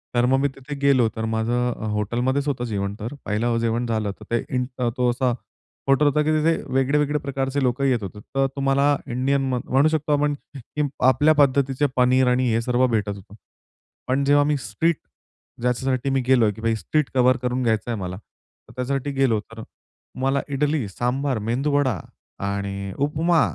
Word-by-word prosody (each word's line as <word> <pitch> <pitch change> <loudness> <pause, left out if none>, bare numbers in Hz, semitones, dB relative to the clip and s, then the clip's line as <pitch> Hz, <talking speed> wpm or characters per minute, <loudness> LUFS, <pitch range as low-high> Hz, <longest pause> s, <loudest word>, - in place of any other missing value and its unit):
तर 120 0 +4
मग 135 +2 +3
मी 140 - +2
तिथे 135 +2 -7
गेलो, 135 -4 +4
तर 110 - -2
माझं 120 +2 0 0.2
हॉटेलमध्येच 120 +7 0
होतं 130 -4 -1
जेवण 100 -3 -2
तर. 115 +5 -5
पहिलं 115 +3 0
जेवण 115 +1 0
झालं, 110 -3 -1
तर - - -12
ते 120 - +1
इंट 125 0 0 0.3
तो 125 -1 +2
असा 125 +1 +1 0.6
हॉटेल 135 +2 +4
होता, 145 +1 +2
की 150 - 0
तिथे 155 +1 +3 0.2
वेगळे-वेगळे 145 +3 +2
प्रकारचे 135 0 -2
लोकं 125 +2 0
येत 125 -5 +1
होते. 100 +2 -7 0.2
तर 135 0 +3
तुम्हाला 140 +1 +2 0.2
इंडियन 135 +3 +1
म 125 - 0
म्हणू 135 +4 +3
शकतो 155 -1 0
आपण, 145 0 +2 0.2
की 145 +3 -3 0.2
आपल्या 150 +4 +5
पद्धतीचे 140 -1 +3
पनीर 125 +1 +4
आणि 125 0 +2
हे 115 - +2
सर्व 125 +2 +2
भेटत 105 -4 0
होतं. 100 +1 -14 0.7
पण 135 +2 +1
जेव्हा 145 +1 +4
मी 145 0 +1
स्ट्रीट 140 +8 0 0.6
ज्याच्यासाठी 125 +2 0
मी 135 -1 +1
गेलोय, 120 -5 +4
की 115 +2 -1
स्ट्रीट 150 +7 -1
कव्हर 130 0 +4
करून 125 +1 -2
घ्यायचं 110 0 0
आहे 115 - -3
मला. 90 0 -4
तर 105 - -22
त्याच्यासाठी 135 +2 -2
गेलो 135 -5 +2
तर 115 +1 -11 0.6
मला 135 +1 +1
इडली, 145 -3 0
सांबार, 125 +5 -1
मेंदूवडा 130 +1 0 0.5
आणि 100 -1 -3
उपमा 155 +4 +2
130 Hz, 175 wpm, -23 LUFS, 115-140 Hz, 0.7 s, आपल्या